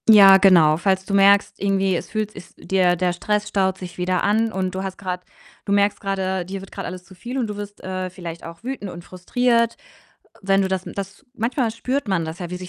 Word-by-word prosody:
Ja 195 -3 +9
genau. 170 -6 +5
Falls 190 +1 0
du 200 - -4
merkst, 200 +1 +4
irgendwie 195 -1 +1
es - - -4
fühlt 215 -1 -2
ist 190 - -13
dir 185 -2 +2
der 180 0 0
Stress 210 +3 -1
staut 190 -1 0
sich 180 -2 -9
wieder 180 0 0
an 220 +2 +2
und 185 -2 -2
du 190 - -3
hast 190 -1 -5
grad 180 -2 -4 0.4
du 200 - -3
merkst 200 0 +2
grade, 190 -2 -1
dir 195 +2 -6
wird 195 - -12
grad - - -6
alles 180 0 -7
zu 175 - -16
viel 240 +8 -6
und 250 - 0
du 210 - -5
wirst, 205 0 -8
äh, 185 0 -3
vielleicht 170 -2 -8
auch 165 +5 -10
wütend 250 -6 -5
und 175 -1 -9
frustriert. 235 +6 0 0.7
Wenn 195 0 +3
du 190 - +1
das 190 -1 -2
m - - -6
das 200 +5 -7
manchmal 240 0 0
spürt 255 +4 -2
man 180 -5 0
das 160 +2 -6
ja, 175 -2 -6
wie 180 - -4
sich 180 0 -8
190 Hz, 235 wpm, -22 LUFS, 180-205 Hz, 0.7 s, Ja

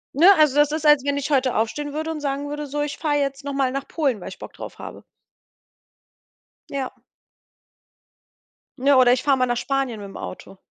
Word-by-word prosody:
Ne, 325 +6 +6
also 300 -3 +4
das 295 0 +4
ist, 310 0 -3
als 295 -3 +6
wenn 285 0 0
ich 285 +1 -3
heute 260 -2 +2
aufstehen 290 +7 -1
würde 315 +2 -3
und 310 - -4
sagen 285 0 -3
würde: 295 0 -5
„So, 290 +1 -3
ich 295 - -4
fahre 300 -2 0
jetzt 275 0 -2
nochmal 275 -2 -1
nach 275 +1 -4
Polen, 270 - -1
weil - - -8
ich - - -11
Bock - - -10
drauf - - -9
habe.“ - - -9 1.7
Ja. 270 -2 -4 1.8
Ne, 275 +1 +4
oder 245 -1 +6
ich 250 - 0
fahre 275 -2 +3
mal 255 - +2
nach 240 -1 -1
Spanien 270 -4 -2
mit 200 - -8
dem - - -10
Auto. 190 +1 -9
280 Hz, 200 wpm, -23 LUFS, 255-295 Hz, 1.8 s, Ne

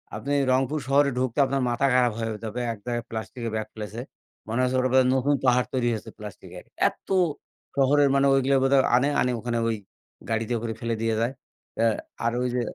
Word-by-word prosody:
আপনি 140 - -3 0.2
রংপুর 135 +4 +1
শহরে 140 +1 +4
ঢুকতে 130 +1 -1
আপনার 135 +1 -1
মাথা 120 +3 +1
খারাপ 125 -2 +3
হয়ে 115 -1 -2
যাবে। 110 +3 -4
এক - - -11
জায়গায় 120 -1 -2
প্লাস্টিকের 115 +1 -5
ব্যাগ 110 0 -3
ফেলেছে। 110 +2 -6 0.5
মনে 115 +3 -1
হচ্ছে 125 0 0
ওটার 130 0 +1
মধ্যে 130 -1 +5
নতুন 140 +2 +2
পাহাড় 125 0 +3
তৈরি 125 -2 +1
হয়েছে 110 - -6
প্লাস্টিকের। 105 -2 -10 0.2
এত! - - -20 0.7
শহরের 140 +1 +4
মানে 140 0 +4
ওইগুলা 135 0 +3
বোধহয় 135 0 +4
আনে, 135 +3 +3
আনে 125 - +1
ওখানে 120 0 -2
ওই 115 - 0 0.5
গাড়িতে 115 +2 -1
করে 115 -1 -3
ফেলে 115 -1 -2
দিয়ে 115 -1 +1
যায়। 120 +3 0 0.4
অ্যা 115 +1 +3 0.4
আর 115 - +2
ওই 125 - +1
যে, 125 - +1
125 Hz, 195 wpm, -25 LUFS, 115-135 Hz, 0.7 s, মধ্যে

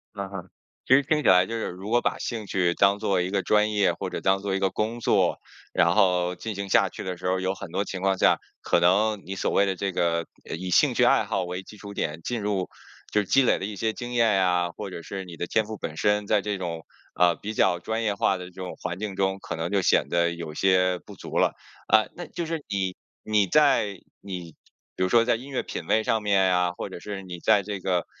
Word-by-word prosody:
嗯 100 -1 -5
哼， 95 -2 -8 0.4
其 130 - +5
实 140 - +4
听 150 +2 +1
起 - - -1
来 90 0 +6
就 115 +4 -5
是 115 - -2
如 95 +3 -7
果 120 +2 +3
把 - - 0
兴 115 -3 -4
趣 90 -3 +1
当 100 +2 +3
做 95 -3 +1
一 90 - -2
个 100 0 0
专 105 0 +3
业， 105 -2 +2
或 - - -5
者 - - -4
当 95 0 +2
做 100 -1 -1
一 - - 0
个 95 0 +2
工 110 +5 -2
作， - - +2 0.3
然 85 0 +3
后 90 -3 +2
进 110 +2 -5
行 100 0 -5
下 100 0 +4
去 - - -8
的 90 -2 -4
时 - - -5
候， 95 0 +1
有 95 +1 -1
很 95 -3 -9
多 100 - 0
情 95 -2 -5
况 95 -1 +1
下， - - +4 0.2
可 - - +2
能 100 +4 +3
你 95 +2 -5
所 - - -1
谓 100 - +3
的 95 -1 -1
这 100 +2 -2
个， 85 -2 0 0.2
呃， - - -3
以 90 +2 -5
兴 - - +4
趣 - - +3
爱 - - +4
好 95 -2 -1
为 90 +1 -4
基 105 - -14
础 100 0 -9
点 80 -3 -3
进 120 -2 -3
入， 100 -3 -1 0.4
就 105 -1 +2
积 135 +8 +3
累 - - +2
的 - - -3
一 105 +1 -5
些 110 +2 -1
经 120 -1 -6
验 115 -2 +4
啊， 90 -1 +1
或 100 +3 -7
者 90 - -7
是 95 +1 -6
你 85 -2 -10
的 - - -2
天 110 +5 +1
赋 110 0 -7
本 80 -4 -6
身， 105 +3 +1
在 105 0 +2
这 105 0 -2
种， 85 -3 -5 0.3
呃， 90 -1 +4
比 105 +2 -6
较 95 -4 +2
专 110 +5 -3
业 105 -2 0
化 95 -1 +1
的 90 - -7
这 90 - -12
种 90 0 -7
环 90 -1 -3
境 100 -1 -5
中， 95 0 0
可 - - -5
能 80 +1 -3
就 100 0 +1
显 - - +3
得 85 0 +2
有 85 -2 -6
些 90 -1 +3
不 - - -11
足 - - -6
了。 - - +4 0.4
啊， 110 0 +5
那 175 - -6
就 170 - -5
是 160 -2 -3
你 95 -2 -1 0.3
你 105 -2 +2
在 105 - +3 0.2
你 90 -5 -7 0.4
比 - - -1
如 95 - +1
说 115 +3 +5
在 120 - +3
音 130 +5 -8
乐 130 - -1
品 85 - -6
味 110 +6 +2
上 110 -1 0
面 100 -2 +3
呀， 90 -1 +2
或 - - -5
者 95 - -8
是 100 0 -6
你 90 -2 -8
在 105 +2 +4
这 100 0 -5
个 90 -1 0
95 Hz, 280 characters per minute, -25 LUFS, 90-105 Hz, 0.4 s, 来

